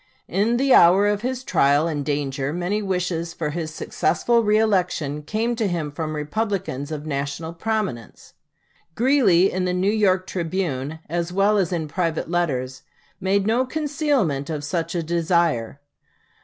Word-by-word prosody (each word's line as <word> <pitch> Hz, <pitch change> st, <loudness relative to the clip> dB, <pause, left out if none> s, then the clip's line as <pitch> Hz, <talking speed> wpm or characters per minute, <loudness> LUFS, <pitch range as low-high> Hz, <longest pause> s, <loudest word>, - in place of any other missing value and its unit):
In 210 Hz, +6 st, +1 dB
the 270 Hz, 0 st, +3 dB
hour 185 Hz, +4 st, +6 dB
of 205 Hz, 0 st, +1 dB
his 255 Hz, +1 st, -3 dB
trial 145 Hz, -, +3 dB
and 150 Hz, -3 st, -2 dB
danger 140 Hz, -1 st, -2 dB
many 180 Hz, +6 st, -1 dB
wishes 180 Hz, -3 st, -2 dB
for 150 Hz, -3 st, -2 dB
his 160 Hz, 0 st, -4 dB
successful 235 Hz, +8 st, +1 dB
reëlection 185 Hz, -9 st, +1 dB
came 225 Hz, +8 st, -1 dB
to 220 Hz, -3 st, +1 dB
him 165 Hz, -5 st, -2 dB
from 155 Hz, +1 st, -4 dB
Republicans 160 Hz, -, -3 dB
of 150 Hz, -1 st, -5 dB
national 145 Hz, +2 st, -3 dB
prominence. 180 Hz, -, -4 dB, 0.6 s
Greeley, 230 Hz, -8 st, +4 dB
in 185 Hz, 0 st, -1 dB
the 180 Hz, 0 st, 0 dB
New 190 Hz, +3 st, +2 dB
York 190 Hz, -4 st, +2 dB
"Tribune" 160 Hz, -6 st, -3 dB
as 170 Hz, +2 st, -2 dB
well 200 Hz, +3 st, +3 dB
as 185 Hz, -3 st, 0 dB
in 165 Hz, -3 st, -2 dB
private 165 Hz, 0 st, -2 dB
letters, 130 Hz, -7 st, -1 dB, 0.4 s
made 195 Hz, +1 st, +1 dB
no 230 Hz, +4 st, +2 dB
concealment 275 Hz, -, -1 dB
of 150 Hz, -2 st, -3 dB
such 165 Hz, +3 st, -2 dB
a 170 Hz, -, -1 dB
desire. 165 Hz, -7 st, 0 dB
175 Hz, 150 wpm, -23 LUFS, 155-205 Hz, 0.6 s, hour